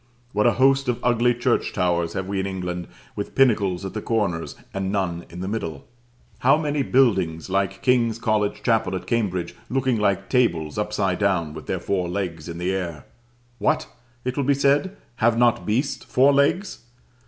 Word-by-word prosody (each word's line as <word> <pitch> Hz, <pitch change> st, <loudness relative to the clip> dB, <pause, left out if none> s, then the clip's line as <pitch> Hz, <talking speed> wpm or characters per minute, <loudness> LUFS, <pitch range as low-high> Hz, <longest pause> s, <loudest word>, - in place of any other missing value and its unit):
What 105 Hz, +3 st, +3 dB
a 120 Hz, -, +4 dB
host 135 Hz, +1 st, +3 dB
of 120 Hz, -, +1 dB
ugly 120 Hz, 0 st, +3 dB
church 120 Hz, -, 0 dB
towers 85 Hz, -2 st, 0 dB
have 95 Hz, -, -3 dB
we 100 Hz, 0 st, -2 dB
in 95 Hz, -, -1 dB
England, 90 Hz, -2 st, -4 dB, 0.3 s
with 100 Hz, -, -5 dB
pinnacles 100 Hz, -8 st, +2 dB
at 95 Hz, -, -5 dB
the 110 Hz, -, -4 dB
corners, 100 Hz, -9 st, -1 dB, 0.2 s
and 95 Hz, -1 st, -2 dB
none 90 Hz, -4 st, -2 dB
in 90 Hz, +1 st, -8 dB
the 95 Hz, -, -3 dB
middle! 95 Hz, -7 st, -4 dB, 0.5 s
How 135 Hz, +4 st, +5 dB
many 150 Hz, -2 st, -1 dB
buildings 95 Hz, -12 st, +2 dB
like 95 Hz, 0 st, -1 dB
King's 120 Hz, -3 st, +2 dB
College 110 Hz, -3 st, 0 dB
Chapel 110 Hz, -6 st, +1 dB
at 90 Hz, -, -5 dB
Cambridge, 100 Hz, -7 st, -1 dB, 0.2 s
looking 130 Hz, -2 st, +1 dB
like 100 Hz, -2 st, +1 dB
tables 85 Hz, -, +1 dB
upside 105 Hz, -3 st, -1 dB
down, 90 Hz, -7 st, +1 dB
with -, -, -9 dB
their -, -, -1 dB
four 90 Hz, -3 st, -1 dB
legs 90 Hz, -4 st, -4 dB
in 85 Hz, -, -6 dB
the 90 Hz, +2 st, -1 dB
air! 85 Hz, -6 st, -4 dB, 0.5 s
What! 155 Hz, 0 st, +1 dB, 0.4 s
it 125 Hz, 0 st, -1 dB
will 140 Hz, -, 0 dB
be 140 Hz, +1 st, +3 dB
said, 145 Hz, +8 st, +2 dB, 0.2 s
have 115 Hz, 0 st, +3 dB
not 120 Hz, -1 st, +2 dB
beasts 125 Hz, +7 st, 0 dB
four 135 Hz, +3 st, +4 dB
legs? 145 Hz, +8 st, +1 dB
105 Hz, 180 wpm, -23 LUFS, 90-125 Hz, 0.5 s, How